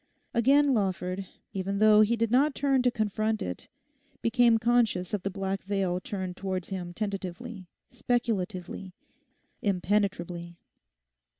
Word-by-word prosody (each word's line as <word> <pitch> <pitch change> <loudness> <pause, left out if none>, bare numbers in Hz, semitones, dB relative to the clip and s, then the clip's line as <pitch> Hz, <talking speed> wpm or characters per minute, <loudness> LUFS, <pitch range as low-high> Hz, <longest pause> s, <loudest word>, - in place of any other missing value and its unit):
Again 275 +4 +4
Lawford, 190 -3 -1 0.3
even 195 +1 -2
though 215 0 +6
he 215 +2 +4
did 230 -1 0
not 275 +4 +3
turn 275 -2 +2
to 250 - +3
confront 215 -1 -1
it, 90 -1 -6 0.6
became 230 0 +4
conscious 225 -6 +1
of 205 - 0
the 195 - -2
black 195 0 -3
veil 190 -2 -1
turned 185 -2 -5
towards 185 -2 -4
him 180 -3 -4
tentatively, 195 +1 -5 0.2
speculatively, 210 -7 -2 0.7
impenetrably. 180 -3 -1
200 Hz, 120 wpm, -28 LUFS, 185-230 Hz, 0.7 s, though